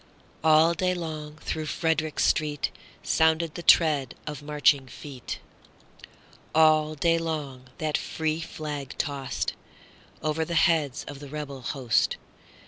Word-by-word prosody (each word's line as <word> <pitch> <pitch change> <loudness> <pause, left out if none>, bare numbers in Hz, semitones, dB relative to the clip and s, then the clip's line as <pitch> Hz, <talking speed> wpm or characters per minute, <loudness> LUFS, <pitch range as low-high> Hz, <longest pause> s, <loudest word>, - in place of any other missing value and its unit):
All 160 +1 +6
day 180 +2 0
long 155 -3 -5
through 155 -1 -3
Frederick 160 -2 0
streetSounded 160 +2 0
the 175 - -6
tread 150 -7 +4
of 150 -2 -5
marching 145 -2 +2
feet:All 155 +3 -2
day 165 +2 +2
long 145 -6 -4
that 155 -1 0
free 160 0 -2
flag 150 -4 -6
tostOver 145 +2 -4
the 170 +1 -3
heads 160 -5 +2
of 145 -1 -7
the 145 -1 -9
rebel 140 -2 -6
host. 125 -1 +1
155 Hz, 110 wpm, -27 LUFS, 145-160 Hz, -, All